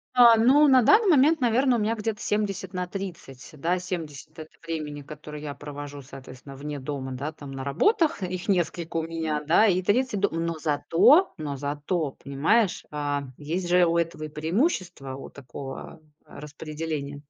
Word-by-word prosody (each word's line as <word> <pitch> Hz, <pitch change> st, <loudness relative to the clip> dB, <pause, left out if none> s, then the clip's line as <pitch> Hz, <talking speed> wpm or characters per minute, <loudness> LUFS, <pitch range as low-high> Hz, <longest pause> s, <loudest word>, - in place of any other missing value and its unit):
Да, 235 Hz, -2 st, +8 dB
ну, 275 Hz, +6 st, +5 dB
на 260 Hz, -2 st, +6 dB
данный 415 Hz, -, +5 dB
момент, 305 Hz, +1 st, +4 dB
наверно, 250 Hz, +2 st, +3 dB
у 235 Hz, -, 0 dB
меня 215 Hz, +2 st, +1 dB
где-то 215 Hz, -1 st, -3 dB
70/30, 185 Hz, -7 st, -4 dB
да, 175 Hz, +4 st, 0 dB
70- 160 Hz, -3 st, -7 dB
это 155 Hz, -, -8 dB, 0.2 s
времени, 150 Hz, -3 st, -4 dB
которое 150 Hz, +1 st, -9 dB
я 145 Hz, -1 st, -5 dB
провожу, 145 Hz, 0 st, -8 dB
соответственно, 135 Hz, 0 st, -11 dB
вне 145 Hz, +1 st, -6 dB
дома, 135 Hz, -1 st, -5 dB
да, 140 Hz, +5 st, -4 dB
там 145 Hz, -3 st, -10 dB
на 135 Hz, 0 st, -6 dB
работах, 305 Hz, -, +2 dB
их 180 Hz, 0 st, -4 dB
несколько 175 Hz, -3 st, -1 dB
у 165 Hz, -, +1 dB
меня, 160 Hz, -2 st, -3 dB
да, 170 Hz, +8 st, +4 dB
и 185 Hz, -1 st, +2 dB
30- 240 Hz, +3 st, +1 dB
дом. 200 Hz, -, +2 dB
Но 170 Hz, -, -1 dB
зато, 180 Hz, -, +4 dB
но 145 Hz, -3 st, -4 dB
зато, 145 Hz, +2 st, -2 dB
понимаешь, 165 Hz, +10 st, +1 dB
а, 145 Hz, -1 st, -2 dB
есть 170 Hz, +5 st, -3 dB
же 180 Hz, +1 st, +4 dB
у 170 Hz, 0 st, +1 dB
этого 165 Hz, -2 st, -2 dB
и 155 Hz, -, -5 dB
преимущества, 165 Hz, -, -1 dB
у 135 Hz, -, -9 dB
такого, 135 Hz, +2 st, -9 dB, 0.3 s
э, -, -, -12 dB
распределения. 150 Hz, -1 st, -6 dB
160 Hz, 165 wpm, -26 LUFS, 145-200 Hz, 0.3 s, Да